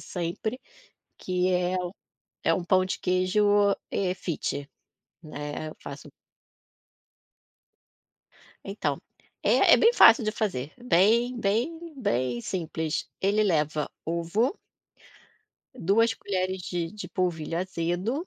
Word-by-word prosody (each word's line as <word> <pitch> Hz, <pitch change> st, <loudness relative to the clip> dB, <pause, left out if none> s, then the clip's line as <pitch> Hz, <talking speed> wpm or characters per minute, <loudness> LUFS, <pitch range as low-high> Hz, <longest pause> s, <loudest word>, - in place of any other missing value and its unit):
sempre, 180 Hz, +7 st, -4 dB, 0.6 s
que 180 Hz, 0 st, -1 dB
é 180 Hz, 0 st, +1 dB
u 175 Hz, -, -4 dB, 0.5 s
é -, -, +3 dB
um 180 Hz, -, -1 dB
pão 185 Hz, +1 st, +3 dB
de 185 Hz, -, -3 dB
queijo, 185 Hz, +3 st, +1 dB, 0.5 s
eh, 185 Hz, -2 st, 0 dB
fit, 145 Hz, -5 st, -4 dB, 0.5 s
né, 150 Hz, 0 st, -6 dB
eu 155 Hz, -, -10 dB
faço -, -, -9 dB, 2.6 s
Então, -, -, -2 dB, 0.4 s
é -, -, +6 dB
é -, -, +5 dB
bem 460 Hz, +1 st, +5 dB
fácil 255 Hz, -, +7 dB
de 215 Hz, -, 0 dB
fazer, 170 Hz, -, -3 dB
bem, 235 Hz, +3 st, +3 dB
bem, 225 Hz, +7 st, +1 dB, 0.2 s
bem 130 Hz, -, -1 dB
simples. 160 Hz, 0 st, -3 dB
Ele 205 Hz, +2 st, +2 dB
leva 155 Hz, -5 st, 0 dB, 0.2 s
ovo 170 Hz, -, 0 dB, 1.2 s
2 225 Hz, +2 st, +2 dB
colheres 185 Hz, -3 st, -2 dB
de 170 Hz, -2 st, -2 dB
de 210 Hz, -, -8 dB
polvilho 170 Hz, -3 st, -2 dB
azedo 185 Hz, -, -2 dB
185 Hz, 110 wpm, -27 LUFS, 165-210 Hz, 2.6 s, fácil